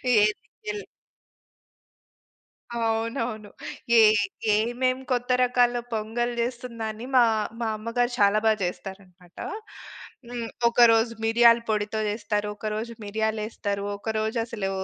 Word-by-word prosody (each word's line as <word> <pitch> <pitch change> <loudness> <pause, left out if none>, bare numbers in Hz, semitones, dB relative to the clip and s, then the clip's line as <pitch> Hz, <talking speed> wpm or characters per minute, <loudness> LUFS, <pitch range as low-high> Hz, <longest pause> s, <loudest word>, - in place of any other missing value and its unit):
ఏది 210 0 +3 0.3
కిల్ 420 0 -4 1.9
అవునవును. 225 -1 -2 0.5
ఏ - - +9 0.5
ఏమేం 245 +4 +1
కొత్త 245 0 0
రకాల 245 -1 +3 0.2
పొంగల్ 230 +3 -1
చేస్తుందా? 235 -1 -4
అని 225 +3 -8
మా, 245 - +8 0.4
మా 230 - 0
అమ్మగారు 240 +3 -1
చాలా 205 +1 +4
బాగా 215 -1 +3
చేస్తారనమాట 180 -1 -8 0.9
హ్మ్. 235 -2 -4 0.2
ఒకరోజు 230 -1 +5
మిరియాల 235 +1 +6
పొడితో 215 0 -1
చేస్తారు. 210 -1 -2
ఒకరోజు 215 +2 -4
మిరియాలేస్తారు. 215 -1 -2
ఒకరోజు 220 +2 -2
అసలు 210 -5 -3
225 Hz, 100 wpm, -25 LUFS, 210-240 Hz, 1.9 s, ఏ